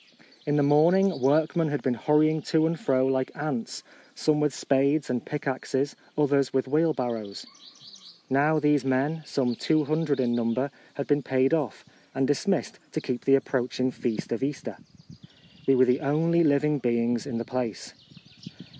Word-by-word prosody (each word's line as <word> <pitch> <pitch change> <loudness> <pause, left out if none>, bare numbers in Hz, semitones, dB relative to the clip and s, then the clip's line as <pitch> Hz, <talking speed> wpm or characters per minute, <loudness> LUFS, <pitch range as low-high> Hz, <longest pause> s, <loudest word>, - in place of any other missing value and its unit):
In 145 - +1
the 145 - +3
morning 170 +5 +3
workmen 155 +4 +2
had 145 -1 -3
been 130 - +1
hurrying 155 +5 +2
to 160 -1 +3
and 165 0 -1
fro 130 -1 +1
like 130 -1 0
ants, 155 +10 -4 0.3
some 155 - +1
with 150 -1 +1
spades 140 +2 +1
and 125 -1 -2
pick 150 - -6
axes, 135 +1 -2 0.2
others 140 -2 +2
with 130 0 0
wheelbarrows. 125 -9 -1 0.8
Now 145 +4 +2
these 150 -2 +2
men, 135 +5 0
some 125 -3 0
200 155 +1 0
in 120 -2 +1
num 115 -1 0
ber, 135 +2 -1 0.2
had 140 - -3
been 145 0 +1
paid 130 +2 +1
off, 145 -9 -2 0.3
and 135 - +1
dismissed 185 +8 -1
to - - -1
keep 125 -5 -4
the 135 - +6
approaching 130 -1 -1
feast 120 -3 -4
of 115 - -2
Easter. 135 +1 -4 0.9
We 135 - +5
were 130 0 +5
the 125 +2 +2
only 165 +4 +2
living 150 0 +2
beings 120 -1 0
in 115 - -3
the 115 - -4
place. 125 -4 -4
140 Hz, 165 wpm, -26 LUFS, 130-150 Hz, 0.9 s, the